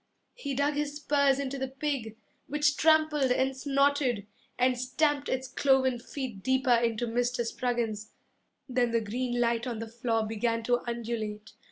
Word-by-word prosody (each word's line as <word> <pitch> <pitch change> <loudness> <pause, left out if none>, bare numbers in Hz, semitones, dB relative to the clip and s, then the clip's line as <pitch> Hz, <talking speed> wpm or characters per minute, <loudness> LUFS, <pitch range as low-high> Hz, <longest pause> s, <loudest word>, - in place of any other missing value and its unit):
He 285 - -4
dug 285 +2 +1
his 290 0 -2
spurs 280 -2 +2
into 275 -1 -3
the 265 - -1
pig, 265 -5 -3 0.3
Which 300 0 +2
trampled 310 -3 +3
and 265 +1 +1
snorted, 275 -5 +1 0.3
And 255 0 +3
stamped 285 +3 0
its 260 0 -1
cloven 260 -1 +2
feet 240 -5 -6
deeper 260 +2 +2
into 235 0 +1
Mr. 240 +1 0
Spruggins. 230 -3 -2 0.6
Then 250 -2 +1
the 230 0 +1
green 240 +3 -2
light 235 +1 +1
on 235 -2 -3
the 225 +1 -5
floor 225 -1 -1
began 230 +1 -1
to 245 +1 +2
undulate. 220 -3 -4
250 Hz, 155 wpm, -29 LUFS, 230-280 Hz, 0.6 s, trampled